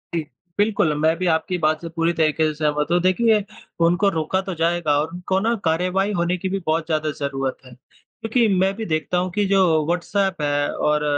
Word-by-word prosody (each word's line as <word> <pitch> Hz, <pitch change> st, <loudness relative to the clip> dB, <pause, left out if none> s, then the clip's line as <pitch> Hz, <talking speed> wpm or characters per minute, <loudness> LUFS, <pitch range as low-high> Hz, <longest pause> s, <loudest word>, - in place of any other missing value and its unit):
जी। 165 Hz, -, +1 dB, 0.4 s
बिल्कुल, 205 Hz, -7 st, +2 dB
मैं 160 Hz, +2 st, +3 dB
भी 185 Hz, +1 st, -1 dB
आपकी 160 Hz, +3 st, -1 dB
बात 155 Hz, -1 st, 0 dB
से 165 Hz, -, -6 dB
पूरी 165 Hz, +1 st, 0 dB
तरीके 160 Hz, -1 st, +1 dB
से 155 Hz, -, -2 dB
सहमत 150 Hz, -1 st, 0 dB
हूँ 175 Hz, -, +4 dB
देखिए 210 Hz, +4 st, +3 dB, 0.4 s
उनको 175 Hz, +4 st, +2 dB
रोका 175 Hz, +5 st, 0 dB
तो 190 Hz, -1 st, -5 dB
जाएगा 165 Hz, -2 st, +1 dB
और 155 Hz, +2 st, -2 dB
उनको 180 Hz, +2 st, -1 dB
न 235 Hz, -, +2 dB
कार्यवाही 180 Hz, +5 st, +1 dB
होने 175 Hz, +1 st, 0 dB
की 190 Hz, -, -3 dB
भी 195 Hz, +1 st, -2 dB
बहुत 160 Hz, +1 st, 0 dB
ज़्यादा 155 Hz, -1 st, -1 dB
ज़रूरत 135 Hz, -2 st, -2 dB
है। 130 Hz, -, -13 dB
क्योंकि 225 Hz, -, -3 dB
मैं 190 Hz, +1 st, +2 dB
भी 220 Hz, +1 st, -5 dB
देखता 155 Hz, 0 st, -1 dB
हूँ 180 Hz, 0 st, -1 dB
कि 205 Hz, -1 st, +2 dB
जो 195 Hz, 0 st, +3 dB, 0.2 s
व्हाट्सऐप 185 Hz, +2 st, -1 dB
है 145 Hz, 0 st, 0 dB
और 150 Hz, 0 st, 0 dB
170 Hz, 205 wpm, -22 LUFS, 155-190 Hz, 0.4 s, हूँ